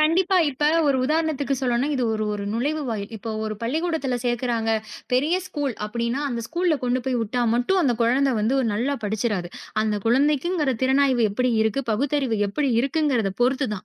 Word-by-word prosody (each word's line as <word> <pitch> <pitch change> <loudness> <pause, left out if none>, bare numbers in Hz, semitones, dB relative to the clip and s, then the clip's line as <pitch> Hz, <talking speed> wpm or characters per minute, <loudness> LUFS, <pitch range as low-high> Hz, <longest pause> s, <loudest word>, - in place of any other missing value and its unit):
கண்டிப்பா. 360 +5 +3
இப்ப 295 +3 +1 0.2
ஒரு 270 - +3
உதாரணத்துக்குச் 300 -3 0
சொல்லணும்னா, 250 +3 +1
இது 255 - -1
ஒரு 215 0 -1
ஒரு 200 -1 -4
நுழைவுவாயில். 240 -5 -2
இப்ப 225 +2 -6
ஒரு 215 0 -3
பள்ளிக்கூடத்துல 310 0 -1
சேர்க்கறாங்க. 240 -2 -1 0.4
பெரிய 290 +7 +2
ஸ்கூல் 285 -8 -3
அப்படின்னா, 235 +5 -2
அந்த 235 -2 -3
ஸ்கூல்ல 345 +1 +1
கொண்டு 250 +1 +1
போய் 260 -2 0
விட்டா 235 +3 -2
மட்டும் 245 +11 +2
அந்தக் 245 -7 +1
குழந்தை 260 +3 +3
வந்து 220 +6 +1 0.2
நல்லா 245 +7 0
படிச்சுறாது. 205 -4 -1 0.3
அந்தக் 210 -1 -1
குழந்தைக்குங்கிற 290 +5 +2
திறனாய்வு 265 -2 +3
எப்படி 250 +4 0
இருக்கு, 220 +5 0
பகுத்தறிவு 260 -1 0
எப்படி 270 +7 -1
இருக்குங்குறத 260 -6 +1
பொறுத்து 260 +1 +2
தான். 200 - -8
255 Hz, 160 wpm, -23 LUFS, 230-290 Hz, 0.4 s, கண்டிப்பா